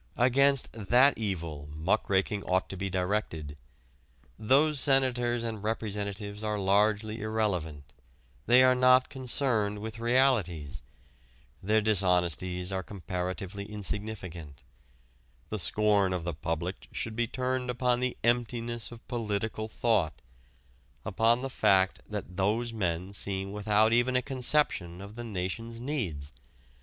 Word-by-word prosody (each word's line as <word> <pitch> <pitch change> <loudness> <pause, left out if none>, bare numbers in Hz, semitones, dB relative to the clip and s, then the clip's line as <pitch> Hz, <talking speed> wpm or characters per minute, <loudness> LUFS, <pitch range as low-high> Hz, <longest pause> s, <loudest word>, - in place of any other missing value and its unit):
Against 135 +2 +4
that 120 +6 +4
evil 85 -9 -4
muckraking 95 +5 0
ought 95 0 0
to - - -4
be 100 +1 -3
directed. 90 -5 -2 0.8
Those 140 +6 +3
senators 125 -3 +2
and 110 -3 -4
representatives 105 -1 -4
are 105 -1 -1
largely 105 +2 +1
irrelevant; 90 -10 -2 0.5
they 125 +2 +7
are 130 0 +6
not 130 0 +4
concerned 120 -5 0
with 110 +2 -7
realities. 115 - +1 0.8
Their 110 +3 +2
dishonesties 90 -3 +1
are 95 -1 -1
comparatively 95 +1 -5
insignificant. 100 -7 -6 0.9
The - - -3
scorn 105 -3 +2
of 90 -2 -3
the 85 0 -3
public 80 +4 -4
should 110 -1 -3
be 120 0 0
turned 130 +1 -2
upon 125 0 +1
the 125 0 -2
emptiness 120 -1 -1
of 115 -1 -13
political 110 -1 -3
thought, 110 -8 0 0.9
upon 115 +4 +2
the - - -1
fact 95 -5 +3
that 100 -4 -6
those 110 +5 0
men 90 -2 -2
seem 95 -1 -1
without 105 +2 +2
even 120 +2 +2
a 125 - +2
conception 125 - 0
of 100 +2 -9
the 120 +1 -7
nation's 115 +3 -4
needs. 95 - -3
105 Hz, 125 wpm, -29 LUFS, 95-120 Hz, 0.9 s, they